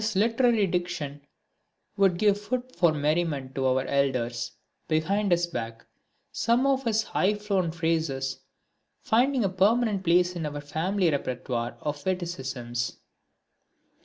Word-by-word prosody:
His 215 -1 -1
literary 230 +1 +3
diction 170 -6 -3 0.7
would 195 -3 +3
give 205 +1 +2
food 255 +4 -4
for 170 -1 +4
merriment 150 -3 -1
to 135 -1 0
our 130 +1 +1
elders 125 -4 0 0.4
behind 195 +6 +1
his 175 0 +3
back, 115 -8 -6 0.5
some 240 +3 +2
of 270 -1 +1
his 220 -1 +2
high 205 0 +1
flown 200 -4 0
phrases 160 -5 -1 0.6
finding 255 +2 +2
a - - +3
permanent 205 +2 +2
place 180 +1 +3
in 165 -3 -2
our 145 0 -5
family 165 +5 0
repertoire 125 -3 -3
of 145 -1 -4
witticisms. 135 -10 -3
175 Hz, 130 wpm, -27 LUFS, 140-205 Hz, 0.7 s, for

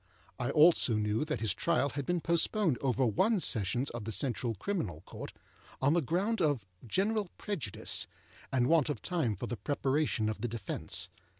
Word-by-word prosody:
I 120 - -1
also 155 -6 +5
knew 105 +3 +1
that 130 - -3
his 110 - +1
trial 160 -4 +1
had 140 -1 -4
been 175 -1 +1
postponed 170 - +2
over 130 -1 +2
one 195 - +3
Sessions 120 - 0
of 120 -2 -5
the 115 - -3
Central 120 +1 -1
Criminal 100 - -3
Court, - - -8 0.5
on 140 +3 +3
the 170 - +3
ground 185 - 0
of 145 - +1 0.2
general 205 - 0
prejudice 155 - -2 0.4
and 125 -2 +3
want 160 0 +4
of 140 -8 -3
time 160 - 0
for - - -5
the 120 - -4
preparation 135 0 0
of 110 -1 -3
the 120 - 0
defence. 110 -5 -2
135 Hz, 175 wpm, -32 LUFS, 110-170 Hz, 0.5 s, also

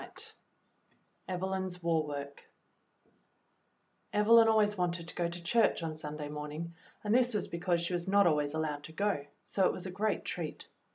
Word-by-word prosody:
y - - -8 1.3
Evelyn^ 190 +1 -1
s 180 -1 -7
War 165 -2 +2
Work 140 -1 -6 1.7
EVELYN 225 +2 +6
always 215 -2 +4
wanted 175 -2 -1
to - - -5
go 170 -1 -1
to 170 0 -7
church 220 0 +3
on 160 -1 -3
Sun 150 -1 -6
day 150 -1 -4
morning, 150 +3 -5 0.3
and 210 0 +1
this 245 -1 +4
was 210 - 0
because 170 0 0
she 170 +1 -2
was 175 +1 -2
not 200 +1 +5
always 150 -2 +2
allowed 150 -2 -2
to 160 - -11
go, 180 -6 0 0.2
so 190 -2 +2
it - - 0
was 185 - -6
a 185 - -4
great 210 +4 -1
treat. - - -4
175 Hz, 180 wpm, -32 LUFS, 155-200 Hz, 1.7 s, EVELYN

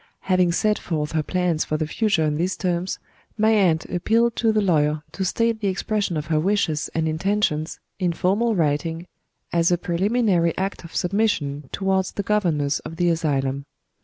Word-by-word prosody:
Having 185 -2 +2
set 210 +4 +1
forth 150 -3 -3
her 160 - +1
plans 175 -1 0
for 155 - -2
the 155 - -1
future 210 +1 +1
in 150 - +1
these 180 +4 -1
terms, 180 0 -1 0.4
my 220 +1 +3
aunt 180 -7 +3
appealed 225 +6 +1
to 225 -2 +3
the 215 - +2
lawyer 155 -6 +1
to 195 - -3
state 230 +4 0
the 205 - -1
expression 195 -2 -1
of 150 - -3
her 155 -1 +1
wishes 165 -4 0
and 160 0 +1
intentions, 160 -1 -1 0.2
in 180 -2 +1
formal 205 +7 +1
writing, 165 +1 -1 0.5
as 170 0 +3
a 175 - +3
preliminary 180 -1 +1
act 195 0 -3
of 170 - -11
submission 170 -8 0
towards 190 -1 0
the 200 - -3
governors 165 -9 +1
of 165 - -9
the 175 +1 +1
asylum. 140 -4 -1
175 Hz, 175 wpm, -23 LUFS, 155-200 Hz, 0.5 s, my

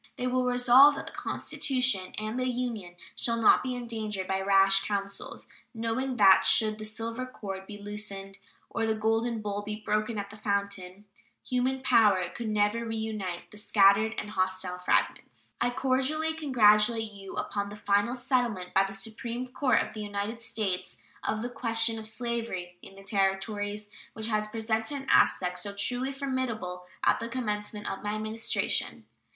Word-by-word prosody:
They 250 -2 -3
will 255 0 +1
resolve 250 +4 +7
that - - -6
the - - -8
Constitution 250 -8 0
and 215 +3 -3
the 255 0 0
Union 235 -8 -3 0.2
shall 230 -1 -1
not 225 - +6
be 255 -1 -3
endangered 220 -5 -4
by 190 0 0
rash 195 0 +5
counsels, 200 -1 -3 0.3
knowing 230 +4 -2
that 195 -3 +7
should 215 -1 +4
"the 215 - -5
silver 230 +3 -4
cord 195 -6 -7
be 205 - -8
loosed 200 -1 -6 0.3
or 225 -1 -1
the 220 - +1
golden 225 +1 0
bowl 205 0 -2
be 210 +1 -5
broken 215 +1 -1
at 200 0 -4
the 215 - -11
fountain" 200 -2 -3 0.4
human 260 +1 0
power 210 -8 +4
could 225 +4 -5
never 210 +2 +1
reunite 220 -6 -4
the 210 - -12
scattered 210 +1 +4
and 210 - -4
hostile 185 -2 -1
fragments. 180 - -1
I 240 - +3
cordially 270 +5 0
congratulate 225 -6 +4
you 195 -1 -10
upon 200 -1 -2
the 205 - -8
final 205 +3 +1
settlement 240 -8 -1
by 195 +1 +4
the 195 - -6
Supreme 230 +5 -5
Court 255 -1 +2
of - - -9
the 215 - -6
United 205 +3 -4
States 215 -5 -3 0.3
of 215 +1 -1
the 245 - -3
question 225 -2 +1
of 220 - -3
slavery 220 -6 -4
in 195 - -13
the 195 - -13
Territories, 205 +1 -1 0.3
which 220 0 -2
had 215 -1 0
presented 225 +4 -1
an - - -15
aspect 180 -1 +3
so 200 +2 -5
truly 250 +6 0
formidable 250 -10 -3 0.2
at - - +3
the 230 - -5
commencement 210 -3 -3
of 195 - -4
my 210 0 -2
Administration. 215 +1 -1
215 Hz, 165 wpm, -29 LUFS, 200-240 Hz, 0.4 s, resolve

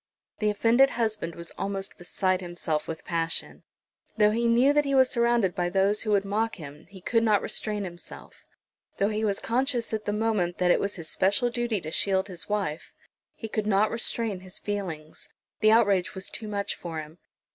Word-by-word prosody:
The 215 - +2
offended 230 +6 +4
husband 215 -7 -1
was 170 0 -5
almost 195 0 -3
beside 185 +1 0
himself 175 -3 -2
with 160 - -6
passion. 165 -1 -1 0.6
Though 210 -1 +5
he 235 +2 +1
knew 245 +5 +5
that 295 0 +4
he 275 -1 0
was 260 -1 +5
surrounded 235 -6 +2
by 175 -2 -1
those 195 +3 +2
who 220 - -4
would 200 -1 +3
mock 220 +3 0
him 150 -2 -11
he 195 -2 -12
could 230 +5 +2
not 215 -3 +3
restrain 210 -2 -2
himself. 175 -2 -9 0.5
Though 200 - +2
he 215 0 -2
was 200 -2 0
conscious 245 -1 -1
at 215 -1 -2
the - - 0
moment 210 -5 0
that 180 -1 +3
it - - +4
was 200 +1 -2
his 165 -4 -7
special 200 +9 +2
duty 235 -3 -1
to 155 - -6
shield 190 +2 +1
his 180 +1 -7
wife, 195 -7 -2 0.4
he 225 - -6
could 215 -1 -2
not 210 +1 +3
restrain 230 -3 -1
his 185 -1 -9
feelings. 180 -7 -5 0.3
The 215 - +5
outrage 200 -5 +3
was 190 0 -3
too 220 - -4
much 200 -1 -2
for 165 -2 -6
him. 155 +2 -10
205 Hz, 195 wpm, -27 LUFS, 180-225 Hz, 0.6 s, Though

